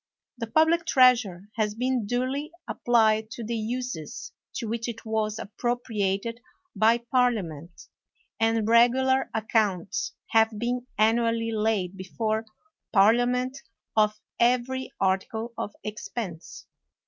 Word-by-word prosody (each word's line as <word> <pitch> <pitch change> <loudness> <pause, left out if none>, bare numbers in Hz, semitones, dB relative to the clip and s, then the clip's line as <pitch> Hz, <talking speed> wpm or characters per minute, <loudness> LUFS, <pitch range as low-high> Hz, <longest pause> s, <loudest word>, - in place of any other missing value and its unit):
The 230 - -3
public 320 +7 +3
treasure 235 - +4
has 210 -1 0
been 250 -2 0
duly 260 +6 -1 0.2
applied 220 -2 +2
to 235 - -6
the 230 +2 -3
uses 230 - -4 0.2
to 235 - -3
which 230 +2 -3
it 230 -1 -6
was 220 -1 -1
appropriated 225 -1 -2 0.4
by 220 +3 +4 0.2
Par 250 -1 +5
liament,, 170 -6 -7 0.5
and 225 -1 +2
regular 260 +3 +4
accounts 210 -5 0 0.2
have 220 -1 +3
been 245 +2 -2
annually 230 +1 +2
laid 210 -4 0
before 220 +3 -2 0.4
Parliament, 245 +5 +3 0.3
of 215 0 +3 0.2
every 250 +2 +1
article 210 +5 -1
of 205 - -5
ex 210 0 -6
pense. 180 -9 -6
225 Hz, 115 wpm, -26 LUFS, 210-245 Hz, 0.5 s, Par